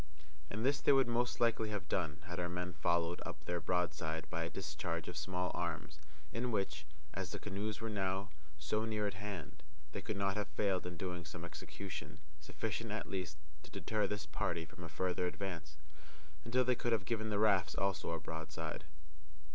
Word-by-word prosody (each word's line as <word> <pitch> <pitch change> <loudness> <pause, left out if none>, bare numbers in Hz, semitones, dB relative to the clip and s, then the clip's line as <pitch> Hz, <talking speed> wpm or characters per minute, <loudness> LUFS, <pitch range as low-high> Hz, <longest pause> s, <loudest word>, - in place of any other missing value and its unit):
And 110 +4 -1
this 140 +2 +4
they - - +6
would 135 -2 +7
most 120 +1 +2
likely 115 -2 +4
have 100 -3 -2
done 85 -4 0
had 90 -1 -3
our 85 0 +1
men 90 0 -2
followed 85 +2 +2
up - - -6
their 85 0 +1
broadside 85 -3 +1
by 85 0 +1
a - - -1
discharge 85 -1 -2
of 90 - -4
small 90 +3 0
arms, 85 -3 -2 0.3
in 125 +2 +1
which, 80 -9 0 0.3
as 95 -3 -2
the - - -3
canoes 105 +1 -2
were 115 - 0
now 100 -1 0 0.3
so 75 +9 +1
near 110 -2 +1
at 100 - +1
hand, 100 -4 -5 0.3
they 100 - -3
could 105 +1 -2
not 100 0 +2
have 105 - +1
failed 95 -3 +2
in 90 -1 -4
doing 90 0 -2
some 85 +2 -6
execution, 80 -2 -5 0.2
sufficient, 75 - -2
at - - -2
least, 90 -6 -2 0.2
to - - -12
deter 110 -1 +1
this 105 0 -2
party 85 -1 0
from 85 +3 -10
a 85 - -5
farther 90 +3 +1
advance, 85 -5 -3 0.7
until 125 +2 +4
they 125 - +5
could 120 -1 +1
have 100 -4 +2
given 110 -2 0
the 105 - +2
rafts 100 -5 +5
also 100 -1 +1
a 85 0 0
broadside. 80 0 -4
95 Hz, 190 wpm, -38 LUFS, 85-105 Hz, 0.7 s, would